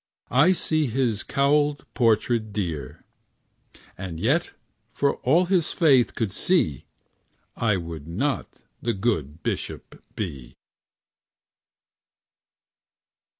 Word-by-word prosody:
I 145 Hz, +8 st, +6 dB
see 155 Hz, -4 st, 0 dB
his 115 Hz, -3 st, 0 dB
cowlèd 145 Hz, +1 st, +2 dB
portrait 115 Hz, -2 st, +2 dB
dear; 85 Hz, -10 st, -4 dB, 0.9 s
And 90 Hz, -4 st, -6 dB
yet, -, -, +1 dB, 0.4 s
for 140 Hz, 0 st, 0 dB
all 165 Hz, +8 st, +3 dB
his 180 Hz, -3 st, +1 dB
faith 135 Hz, -8 st, +4 dB
could 110 Hz, -4 st, -1 dB
see, 100 Hz, -, +1 dB, 0.7 s
I 105 Hz, -4 st, +1 dB
would 85 Hz, -4 st, -7 dB
not 120 Hz, +8 st, -3 dB, 0.2 s
the 120 Hz, -, 0 dB
good 85 Hz, -, -2 dB
bishop -, -, -5 dB
be. 70 Hz, -, -6 dB
115 Hz, 95 wpm, -25 LUFS, 85-140 Hz, 0.9 s, I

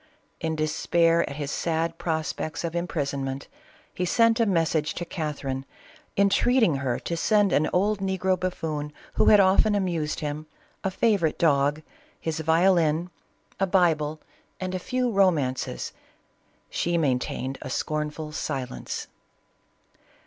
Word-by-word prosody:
In 160 Hz, -2 st, -1 dB
despair 165 Hz, +2 st, +2 dB
at 140 Hz, -, -6 dB
his 145 Hz, -1 st, -4 dB
sad 165 Hz, 0 st, -1 dB
prospects 160 Hz, -1 st, -2 dB
of 170 Hz, 0 st, -3 dB
imprisonment, 140 Hz, -5 st, -2 dB, 0.5 s
he 180 Hz, -, -2 dB
sent 230 Hz, +5 st, +3 dB
a 230 Hz, -, +3 dB
message 165 Hz, -4 st, +1 dB
to 175 Hz, -, -4 dB
Catherine, 140 Hz, -5 st, -3 dB, 0.5 s
entreating 200 Hz, -, +3 dB
her 130 Hz, -3 st, -1 dB
to 170 Hz, -, -3 dB
send 205 Hz, +2 st, +3 dB
an 155 Hz, -, +3 dB
old 205 Hz, +3 st, +2 dB
negro 190 Hz, -1 st, +1 dB
buffoon 155 Hz, -5 st, -3 dB, 0.2 s
who -, -, +3 dB
had 210 Hz, -, +8 dB
often 200 Hz, +2 st, +4 dB
amused 170 Hz, -6 st, -1 dB
him, 150 Hz, +1 st, -4 dB, 0.4 s
a 190 Hz, -, +1 dB
fa 210 Hz, +2 st, +2 dB
vorite 160 Hz, -3 st, 0 dB
dog, 145 Hz, -1 st, +2 dB, 0.4 s
his 160 Hz, -1 st, -3 dB
violin, 165 Hz, 0 st, +3 dB, 0.5 s
a 195 Hz, -, +2 dB
Bible, 160 Hz, -5 st, +2 dB, 0.4 s
and 185 Hz, 0 st, -3 dB
a 185 Hz, -, -1 dB
few 250 Hz, +5 st, -1 dB
romances. 165 Hz, -, +1 dB, 0.8 s
She 170 Hz, 0 st, 0 dB
maintained 130 Hz, -2 st, -1 dB
a -, -, -6 dB
scornful 150 Hz, +2 st, -3 dB
silence. 130 Hz, -, -4 dB
165 Hz, 130 wpm, -26 LUFS, 150-185 Hz, 0.8 s, had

